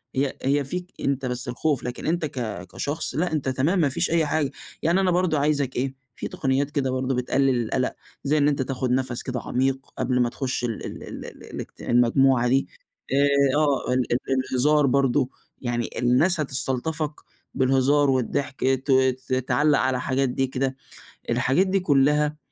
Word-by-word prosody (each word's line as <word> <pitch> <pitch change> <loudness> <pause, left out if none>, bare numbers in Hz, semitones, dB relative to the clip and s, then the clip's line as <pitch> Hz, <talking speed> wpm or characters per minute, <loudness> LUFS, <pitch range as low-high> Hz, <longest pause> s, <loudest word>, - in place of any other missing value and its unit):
هي 135 0 0
هي 140 +2 +2
فيك 180 +6 -5
أنت 135 -1 -1
بس 125 0 -3
الخوف، 130 +1 -1
لكن 125 0 -5
أنت 165 0 0
ك 115 - -5
كشخص 145 - -3
لأ، 175 +5 0
أنت 140 -3 -1
تمام 145 +9 +1
ما 150 -4 +3
فيش 170 +6 0
أي 165 -2 +3
حاجة. 150 -2 0 0.3
يعني 170 +4 +2
أنا 185 -2 +2
برضه 175 -4 +1
عايزك 140 -2 0
إيه، 130 +2 -1 0.2
في - - -5
تقنيات 135 +2 -1
كده 135 -3 0
برضه 130 0 -1
بتقلل 125 0 +1
القلق، 125 +3 -1 0.3
زي 150 +2 +2
إن 145 0 +3
أنت 140 -2 +1
تاخد 130 -1 -2
نفس 125 -1 0
كده 130 -2 -3
عميق 135 +1 0 0.2
قبل 125 -1 +1
ما 120 - +2
تخُش 130 0 -3
ال 115 -3 -3
ال - - -7
ال - - -8
ال - - -11
الاجت - - -9
المجموعة 125 +1 +3
دي، 135 +2 +2 0.5
آآ، 140 -1 +3
آه، 145 -4 +1
ال 125 -1 0
ال - - +3 0.4
الهزار 150 +3 +3
برضه، 135 0 +2 0.3
يعني 120 -2 -2
الناس 140 +9 +3
هتستلطفك 145 +2 -1 0.4
بالهزار 135 +2 +3
والضحك، 130 +1 -1
ت 130 +1 +1
ت 130 0 +2
تعلّق 145 +3 +2
على 130 -1 0
حاجات 130 +1 0
دي 135 +1 0
كده. 130 0 -2 0.5
الحاجات 130 +10 +2
دي 195 +1 +2
كلّها 150 -2 +2
135 Hz, 175 wpm, -24 LUFS, 130-145 Hz, 0.5 s, ما